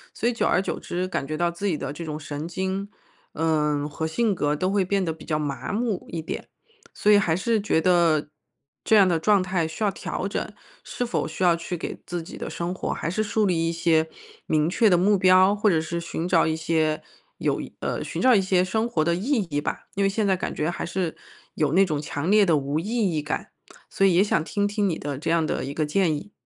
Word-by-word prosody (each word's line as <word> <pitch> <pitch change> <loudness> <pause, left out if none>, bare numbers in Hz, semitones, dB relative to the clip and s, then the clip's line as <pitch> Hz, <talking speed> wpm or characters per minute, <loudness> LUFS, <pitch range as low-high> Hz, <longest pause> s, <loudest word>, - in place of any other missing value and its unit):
所 235 - 0
以 245 - +2
久 - - 0
而 - - +3
久 - - -3
之， 180 +1 -3
感 135 -7 -3
觉 155 0 -3
到 170 +1 +1
自 200 +4 -3
己 160 -5 0
的 135 - -4
这 170 - -7
种 150 -1 -4
神 145 +2 -5
经， 190 +3 -3 0.4
嗯， 150 -2 +1
和 160 +2 -3
性 215 +5 +1
格 150 -4 0
都 185 +5 -1
会 200 -2 +2
变 195 0 +1
得 165 - -1
比 - - -14
较 155 -2 0
麻 140 -2 -3
木 220 -3 -1
一 165 - -4
点。 - - -6 0.5
所 210 - +2
以 205 - +7
还 165 -6 +1
是 220 +3 +1
觉 200 -6 +1
得 165 -4 +3 0.5
这 220 - +4
样 195 -3 +7
的 165 -3 +1
状 200 +1 +3
态 175 -3 0
需 160 +7 -5
要 200 - +2
调 185 - -4
整， - - -4 0.3
是 245 - -3
否 240 - -1
需 160 +4 -4
要 175 -1 +6
去 170 +1 -5
给 - - -6
自 175 -2 -4
己 - - -10
的 - - -5
生 175 +1 -3
活， - - -3
还 - - -4
是 215 +5 -1
树 215 0 +1
立 165 -3 +1
一 - - 0
些 160 -1 +2 0.4
明 155 0 +2
确 220 +3 +3
的 175 - +5
目 200 +3 +3
标？ 185 +1 +6
或 210 0 +2
者 165 -3 +3
是 170 +2 -3
寻 170 0 -4
找 165 -3 +3
一 160 - 0
些 160 -1 0 0.3
有 - - 0
意 - - -10
呃， - - -2
寻 - - -5
找 255 -1 +6
一 200 - +5
些 185 -1 +2
生 220 +5 0
活 160 -9 0
的 170 +2 +1
意 225 +3 0
义 145 - 0
吧。 - - -4
因 200 - +1
为 195 - +3
现 210 +1 0
在 190 -2 +2
感 - - -4
觉， 155 +3 -1
还 - - -5
是 170 -1 -2 0.4
有 150 -1 +1
那 195 +2 +5
种 150 -4 -2
强 155 +4 -2
烈 210 -1 +6
的 165 -4 +3
无 140 +2 -1
意 200 +6 -5 0.3
义 150 - 0
感， 150 - -4 0.4
所 195 - +2
以 180 -3 +4
也 190 - +5
想 205 - +1
听 205 +4 -1
听 205 -1 0
你 165 - -2
的 145 -1 -4
这 155 - -3
样 165 -1 +2
的 - - -2
一 140 - -5
个 155 0 0
建 160 0 +1
议。 205 +8 -8
175 Hz, 270 characters per minute, -24 LUFS, 160-195 Hz, 0.5 s, 以